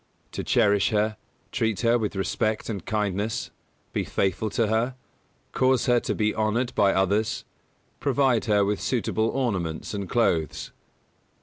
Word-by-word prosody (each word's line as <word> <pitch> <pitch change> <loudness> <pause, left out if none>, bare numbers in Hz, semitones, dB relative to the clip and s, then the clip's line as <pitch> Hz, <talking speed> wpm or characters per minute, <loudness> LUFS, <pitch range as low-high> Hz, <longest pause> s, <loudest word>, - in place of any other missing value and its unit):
To - - -4
cherish 105 -3 +3
her; 110 -1 +1 0.4
treat 110 -4 0
her 120 0 +3
with 105 -2 -2
respect 110 +3 -1
and 100 -6 -4
kindness; 105 0 -2 0.4
be - - 0
faithful 100 +3 -1
to 115 - +1
her; 115 +4 0 0.6
cause 130 -1 +2
her 120 -2 +4
to - - -2
be 105 -1 +1
honoured 110 +3 0
by 100 -1 +4
others; 100 +3 +1 0.5
provide 135 -4 +2
her 105 -2 +3
with 105 0 -1
suitable 110 -2 0
ornaments 95 -14 -2
and 100 -2 -4
clothes. 85 -10 0
110 Hz, 140 wpm, -25 LUFS, 100-120 Hz, 0.6 s, her